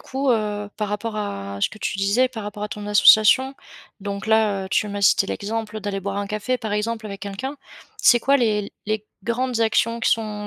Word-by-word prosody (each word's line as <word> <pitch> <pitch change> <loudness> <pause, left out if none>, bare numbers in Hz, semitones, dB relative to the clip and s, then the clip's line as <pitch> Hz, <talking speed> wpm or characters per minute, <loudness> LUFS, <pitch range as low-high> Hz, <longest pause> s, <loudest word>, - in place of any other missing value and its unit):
coup, 270 0 -1
heu, 210 -3 -1
par 210 -1 -2
rapport 215 +2 -3
à 100 - -4
ce - - +2
que 215 - -13
tu 195 - -3
disais, 210 +6 +2
par 225 -4 -7
rapport 205 0 -6
à 210 - -3
ton 210 -1 -7
association, 215 +6 +6 0.4
donc 200 +1 -5
là, 210 -3 +2
heu, - - -10
tu - - +2
m'as 205 0 -4
cité 195 - +4
l'exemple 215 +1 -4
d'aller 200 -1 -3
boire 200 +1 -3
un 205 - -2
café, 215 +4 -1
par 220 -3 -5
exemple, 220 +2 -2
avec 200 -1 -7
quelqu'un. 210 +8 -5 0.4
C'est 240 -1 +6
quoi, 275 +3 +4
les 215 -5 0
les 215 0 -2 0.2
grandes 245 +1 -1
actions 230 +1 +2
qui - - +1
sont 210 -2 -1
210 Hz, 210 wpm, -22 LUFS, 205-230 Hz, 0.4 s, association